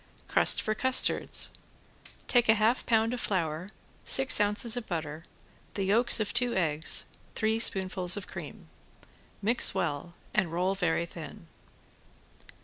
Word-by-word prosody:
~CRUST - - +3
FOR 215 - -1
CUSTARDS~ 260 +4 +1 0.8
Take 240 -2 +2
a 220 - +6
half 220 +4 0
pound 225 0 +1
of 245 - -4
flour, 170 -2 -3 0.3
six 265 -5 +6
ounces 210 +3 +1
of 245 -2 -6
butter, 160 -2 -6 0.5
the 195 - -2
yolks 225 +6 +2
of 215 - -3
two 240 0 +1
eggs, 160 -4 0 0.3
three 220 0 0
spoonfuls 185 -3 +2
of 205 - -6
cream. 150 - -10 0.8
Mix 230 +4 +2
well 155 +4 -4 0.2
and 190 -6 0
roll 180 +3 -1
very 170 -3 -1
thin. 165 0 -11
195 Hz, 135 wpm, -28 LUFS, 170-225 Hz, 0.8 s, a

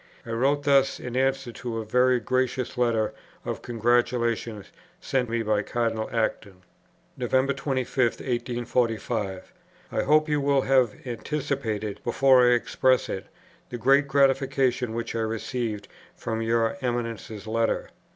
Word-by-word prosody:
I 115 - -6
wrote 135 +5 +1
thus 140 -1 +3
in 125 0 -6
answer 135 -1 0
to 115 0 -5
a 110 - -4
very 125 +3 +3
gracious 130 +1 -1
letter 115 -3 +1 0.3
of - - -4
congratulation 120 -2 0 0.3
sent 125 -3 -1
me 115 0 -1
by 105 -1 +1
Cardinal 115 0 -2
Acton: 105 -4 -2 0.5
"Nov. 125 -2 -4 0.2
25, 135 -2 -3
1845. 120 -4 -2 0.4
I - - 0
hope 155 +1 +3
you 150 -1 +1
will 140 -1 +3
have 130 -4 +3
anticipated, 120 -5 -3
before 125 0 +5
I - - +5
express 130 +2 +1
it, 95 - -5 0.4
the 120 - -5
great 135 +4 +4
gratification 135 -3 +2
which 115 0 -3
I 115 - -2
received 110 -1 -3 0.3
from 115 -1 -3
your 115 +2 +1
Eminence's 115 -4 -3
letter. 115 +1 0
120 Hz, 130 wpm, -26 LUFS, 115-130 Hz, 0.5 s, before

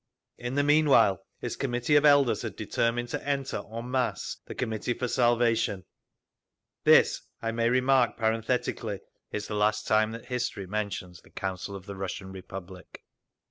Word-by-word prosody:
In 120 +2 -4
the 145 - +3
meanwhile, 145 - +4 0.2
its 120 - -3
Committee 125 +2 0
of 145 +1 +5
Elders 145 -4 +5
had - - -5
determined 120 +1 -1
to - - -4
enter 140 -1 -1
en 115 +2 -6
masse 130 -2 -1
the - - -7
Committee 110 +2 -2
for 125 - -2
Salvation…. 120 -6 +2 1.0
This, - - +5 0.2
I 115 - -2
may 115 0 +1
remark 130 0 +3
parenthetically, 115 -2 -1 0.3
is 105 0 -4
the - - -5
last 105 +1 +1
time 110 0 +2
history 125 -5 -3
mentions 95 -3 -4
the - - -20
Council 95 +1 -4
of 95 -1 -9
the 100 0 -7
Russian 95 0 -5
Republic…. 95 -1 -10
115 Hz, 150 wpm, -28 LUFS, 100-125 Hz, 1.0 s, of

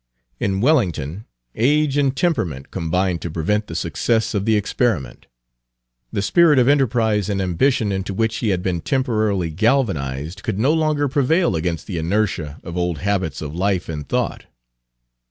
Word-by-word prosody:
In 95 -1 0
Wellington 100 - +1 0.3
age 145 +4 +2
and 140 -2 +1
temperament 90 - -1
combined 90 +2 -1
to 85 - -4
prevent 105 +7 -1
the 80 - -7
success 110 +7 0
of 100 -2 -1
the 110 -1 +3
experiment; 105 - -1 0.8
the 100 - -1
spirit 155 - +4
of 125 -1 +4
enterprise 115 -7 +2
and 100 -1 -1
ambition 105 +5 +1
into 95 0 -3
which 110 +3 0
he 110 - -1
had 90 -2 0
been 90 -3 -1
temporarily 110 - 0
galvanized 90 - 0
could 95 - -3
no 130 +8 +3
longer 155 -2 +1
prevail 145 - +2
against 85 0 -2
the 90 -5 -4
inertia 85 -4 -1
of 85 - -7
old 90 -2 -1
habits 95 -6 -2
of 75 -1 -6
life 95 +1 0
and 75 -4 -6
thought. - - -2
100 Hz, 155 wpm, -21 LUFS, 85-125 Hz, 0.8 s, spirit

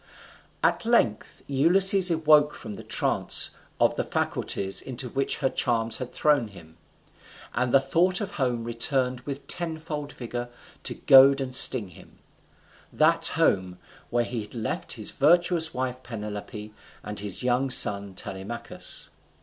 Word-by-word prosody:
At - - +1
length 220 - 0
Ulysses 185 +7 +4
awoke 155 -2 +3
from 110 - -9
the - - -10
trance - - +2 0.3
of - - +2
the - - -1
faculties 95 0 -2
into 130 -1 -6
which 135 +3 -2
her - - +3
charms 115 -3 -1
had 125 -1 -7
thrown 145 -6 +1
him, 80 -5 -16 0.8
and 125 0 -1
the 135 - +5
thought 170 +8 +1
of 205 - -5
home 125 -4 -2
returned 125 +2 -1
with 140 0 -6
tenfold 160 -3 -4
vigour 120 0 -7 0.4
to - - 0
goad 135 +1 +6
and 130 -1 -5
sting 120 -5 +6
him; 85 - -18 0.7
that 165 +1 +3
home 95 - 0 0.3
where 120 0 0
he 120 -1 -5
had 105 +3 -12
left 110 -2 -4
his - - -5
virtuous 170 +2 +2
wife 130 0 -4
Penelope, 105 -2 -8 0.3
and 105 0 -5
his 100 +3 -4
young 125 +2 0
son 100 -5 +5
Telemachus. 110 +6 -6
125 Hz, 140 wpm, -25 LUFS, 115-150 Hz, 0.8 s, goad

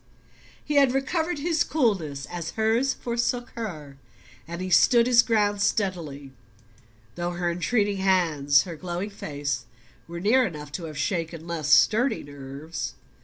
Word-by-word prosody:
He 300 -1 0
had 270 -2 +4
recovered 320 +5 -1
his 315 +1 +1
coolness 180 - 0
as 170 -2 -5
hers 225 +5 +2
forsook 240 0 -2
her, 155 -12 -7 0.5
and 175 +2 -3
stood 235 +4 +6
his 240 -1 +6
ground 205 -3 +1
steadily, 165 -10 -1 0.8
though 175 +4 -3
her 175 0 -1
entreating 205 +3 0
hands, 165 -7 +3
her 175 -3 -7
glowing 180 +4 -4
face, 145 -8 -4 0.4
were 170 0 -6
near 225 +8 +4
enough 150 -9 -5
to 165 +3 -5
have 155 -2 -8
shaken 165 0 -2
less 170 -3 -3
sturdy 245 +5 +4
nerves. 145 +3 -7
180 Hz, 135 wpm, -25 LUFS, 155-235 Hz, 0.8 s, stood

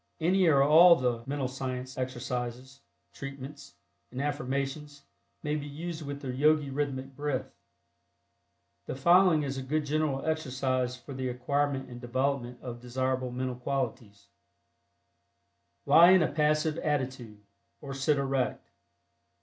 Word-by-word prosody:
Any 180 +3 +3
or 140 -4 +5
all 165 +4 +8
the 125 -5 -1
"Mental 140 -1 -1
Science" 130 0 -5
exercises, 125 +1 -4 0.3
"treatments" 140 +1 -9 0.3
and 130 - -7
"affirmations" 140 +1 -3 0.4
may 150 0 -1
be 145 -1 -4
used 160 +3 -6
with 140 -1 -6
the 130 -2 -3
Yogi 150 +1 +2
Rhythmic 135 -1 -3
Breath. 145 -2 -3 1.3
The - - -4
following 170 +2 +5
is 135 -1 -3
a - - -4
good 150 +3 -1
general 150 -2 -1
exercise 130 -5 -1
for 135 +3 -10
the 130 -1 -3
acquirement 135 +2 -1
and 120 -1 -10
development 125 0 -2
of 120 -2 -6
desirable 130 +1 -2
mental 130 +1 -3
qualities: 125 -5 -4 1.6
Lie 170 +2 +8
in 185 -3 +5
a - - 0
passive 155 +1 +1
attitude, 130 -7 -3 0.4
or 140 -2 -7
sit 140 +2 +1
erect. 135 -2 -1
135 Hz, 130 wpm, -29 LUFS, 130-150 Hz, 1.6 s, all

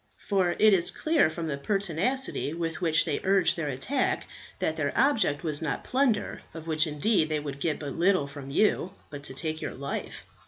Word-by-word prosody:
For 185 -3 +1
it 215 -1 +6
is 175 -3 +2
clear 315 - +2
from 165 +1 -5
the 145 -3 -3
pertinacity 195 - -1
with 165 +1 -3
which 160 -3 +3
they - - -1
urged 190 -2 +3
their 165 -3 -2
attack 145 - 0 0.3
that 160 - -1
their 145 -3 -1
object 225 - +2
was 155 -2 -2
not 155 -3 -2
plunder, 255 -5 +1
of 160 -1 -7
which 160 0 +1
indeed 155 +3 +1
they 155 -1 0
would 140 -2 -6
get 155 +1 0
but 145 -3 -5
little 185 -2 +3
from 140 -1 -9
you, 185 +3 +2 0.2
but 145 -1 -7
to 130 - -8
take 155 +2 -3
your - - -4
life." 140 +1 -5
165 Hz, 195 wpm, -28 LUFS, 150-200 Hz, 0.3 s, it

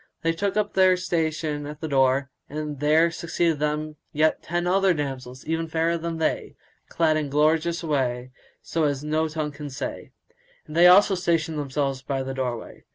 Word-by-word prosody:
They 165 - +3
took 200 +4 -2
up 210 -1 0
their 185 -1 +5
station 160 -4 -2
at 150 0 -8
the 160 - -4
door, 135 -1 +2 0.2
and 150 -1 -5
there 155 +3 +4
succeeded 165 -1 -1
them 150 0 -2
yet 155 +1 +1
other 180 +2 +2
ten - - -6
damsels 130 -3 -5
even 165 +1 -1
fairer 165 +1 0
than 165 0 -3
they, 160 - -1 0.3
clad 160 -2 +2
in 150 -2 -2
gorgeous 160 +4 +2
array, 130 -5 -1 0.3
such 165 - -1
as 140 0 -4
no 155 +1 0
tongue 155 -1 -3
can 145 0 -8
say; 130 - -6 0.5
and 155 - -10
they 175 +1 +7
also 195 +3 +7
stationed 165 -4 0
themselves 135 -1 -2
by 135 0 -2
the 135 0 -4
doorway. 125 -3 -4
155 Hz, 175 wpm, -25 LUFS, 145-165 Hz, 0.5 s, they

